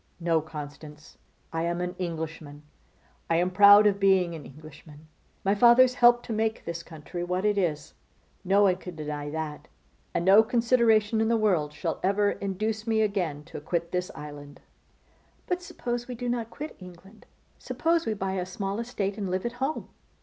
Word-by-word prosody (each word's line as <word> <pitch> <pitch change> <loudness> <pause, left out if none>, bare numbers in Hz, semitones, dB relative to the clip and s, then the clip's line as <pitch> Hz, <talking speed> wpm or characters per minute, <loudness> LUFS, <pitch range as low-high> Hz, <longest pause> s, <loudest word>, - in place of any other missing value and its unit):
No! 165 -2 +1
Constance, 150 0 -10 0.3
I 165 - -1
am 170 +1 -1
an 180 0 -3
Englishman: 160 -4 -5 0.7
I 165 - +2
am 180 +2 +1
proud 205 +2 +8
of 200 -1 +3
being 190 -3 +3
an 155 -3 -8
Englishman. 155 +1 -14 0.4
My 195 - +3
fathers 240 +4 +6
helped 240 -1 +5
to 230 - -4
make 220 +1 -1
this 170 0 -4
country 165 +1 -7
what 180 +3 -2
it 210 -1 +2
is; 160 -7 -2 0.5
no 200 +2 +3
one 185 -2 +3
can 180 -2 -9
deny 150 -1 -5
that; 155 0 -5 0.5
and 170 - 0
no 195 +3 +8
consideration 225 -2 +2
in 220 - +2
the 230 0 +2
world 180 -9 +1
shall 165 +2 -4
ever 200 +2 +2
induce 215 +3 -3
me 220 -1 +2
again 175 -8 -2
to 155 - -9
quit 170 +2 -2
this 180 0 -2
island.' 145 -1 -10 0.9
'But 360 0 -2
suppose 240 -8 -5
we 250 - -6
do 245 +1 -5
not 240 -2 -2
quit 305 +5 -8
England. 185 +3 -14 0.3
Suppose 335 0 0
we 220 - 0
buy 195 -1 -3
a 185 -2 -2
small 195 +2 -4
estate 215 -4 -3
and 195 -2 -3
live 185 +3 -2
at 235 - -2
home. 280 +4 -2
190 Hz, 180 wpm, -27 LUFS, 165-220 Hz, 0.9 s, proud